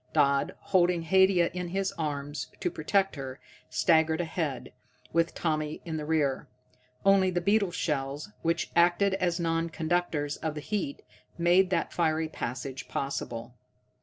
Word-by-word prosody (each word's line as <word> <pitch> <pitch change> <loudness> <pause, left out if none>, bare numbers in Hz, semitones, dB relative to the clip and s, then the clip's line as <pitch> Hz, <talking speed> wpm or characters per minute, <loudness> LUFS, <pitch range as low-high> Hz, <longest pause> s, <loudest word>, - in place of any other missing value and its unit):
Dodd, 140 0 +2
holding 175 -2 +2
Haidia 190 0 +4
in 180 0 -3
his 195 +2 -1
arms, 145 -2 -4
to - - -1
protect 195 +4 +1
her, 135 -1 -6 0.3
staggered 160 -1 +3
ahead, 160 -5 -3 0.4
with 165 0 +1
Tommy 155 -2 -1
in 160 -2 -3
the 150 - -4
rear. 150 -4 +1 0.6
Only 195 -1 +5
the 175 -1 0
beetle 200 +2 +2
shells, 145 +1 -2
which 170 +1 0
acted 175 +3 +4
as 180 -2 0
non 165 0 0
conductors 160 -3 -1
of 160 -1 -3
the - - -3
heat, 180 -4 -3 0.3
made 175 +2 +4
that 190 - -1
fiery 160 -1 +1
passage 130 -1 -5
possible. 120 -3 -4
165 Hz, 140 wpm, -29 LUFS, 150-180 Hz, 0.6 s, Only